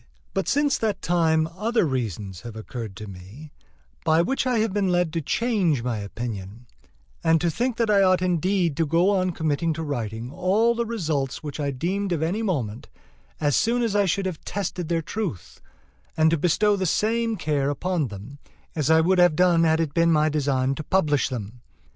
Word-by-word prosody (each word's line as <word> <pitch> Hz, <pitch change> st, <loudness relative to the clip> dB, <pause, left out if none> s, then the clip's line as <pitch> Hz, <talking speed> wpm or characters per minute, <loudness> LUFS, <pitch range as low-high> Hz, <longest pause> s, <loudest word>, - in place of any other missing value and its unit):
But 195 Hz, -, -1 dB
since 290 Hz, 0 st, +2 dB
that 210 Hz, -4 st, -1 dB
time 160 Hz, -2 st, +2 dB
other 225 Hz, +1 st, +1 dB
reasons 105 Hz, -, -3 dB
have 120 Hz, -2 st, -9 dB
occurred 110 Hz, -2 st, -7 dB
to 105 Hz, -, -8 dB
me, 100 Hz, +10 st, -11 dB, 0.5 s
by 160 Hz, +2 st, +3 dB
which 265 Hz, +5 st, -1 dB
I 250 Hz, -2 st, +1 dB
have 220 Hz, -2 st, 0 dB
been 200 Hz, -2 st, +1 dB
led 175 Hz, -3 st, +1 dB
to 165 Hz, -, -1 dB
change 180 Hz, -, 0 dB
my 120 Hz, -3 st, -2 dB
opinion, 105 Hz, +1 st, -6 dB, 0.6 s
and 165 Hz, 0 st, +4 dB
to 170 Hz, 0 st, 0 dB
think 245 Hz, +5 st, -1 dB
that 230 Hz, -2 st, +1 dB
I 200 Hz, -1 st, +5 dB
ought 185 Hz, -1 st, +4 dB
indeed 180 Hz, -2 st, +1 dB
to 165 Hz, -2 st, +1 dB
go 170 Hz, +6 st, +3 dB
on 185 Hz, -2 st, +1 dB
committing 160 Hz, -1 st, -1 dB
to 160 Hz, +1 st, -5 dB
writing 120 Hz, -4 st, -4 dB
all 205 Hz, +9 st, +2 dB
the 235 Hz, 0 st, -2 dB
results 155 Hz, -, -2 dB
which 150 Hz, 0 st, -6 dB
I 145 Hz, -1 st, -1 dB
deemed 185 Hz, +9 st, -2 dB
of 160 Hz, -2 st, -1 dB
any 185 Hz, +7 st, -1 dB
moment, 130 Hz, -, -3 dB, 0.5 s
as 145 Hz, -2 st, +1 dB
soon 240 Hz, +1 st, +2 dB
as 220 Hz, -3 st, -1 dB
I 205 Hz, -1 st, +3 dB
should 195 Hz, +2 st, 0 dB
have 185 Hz, -4 st, -4 dB
tested 180 Hz, -4 st, -4 dB
their 165 Hz, -1 st, 0 dB
truth, 190 Hz, -, -5 dB, 0.6 s
and 160 Hz, 0 st, +4 dB
to -, -, +3 dB
bestow 205 Hz, +6 st, +3 dB
the 190 Hz, -2 st, -1 dB
same 225 Hz, +5 st, +1 dB
care 145 Hz, -4 st, 0 dB
upon 160 Hz, +1 st, -1 dB
them 110 Hz, +7 st, -10 dB, 0.4 s
as 150 Hz, -2 st, 0 dB
I 160 Hz, 0 st, +6 dB
would 180 Hz, +3 st, +2 dB
have 175 Hz, -3 st, +5 dB
done 175 Hz, -1 st, +4 dB
had 160 Hz, 0 st, +3 dB
it 160 Hz, -3 st, -1 dB
been 170 Hz, 0 st, +3 dB
my 155 Hz, -1 st, +3 dB
design 135 Hz, -3 st, 0 dB
to 155 Hz, -, -6 dB
publish 150 Hz, -5 st, +1 dB
them. 120 Hz, -1 st, -6 dB
165 Hz, 195 wpm, -24 LUFS, 140-195 Hz, 0.6 s, I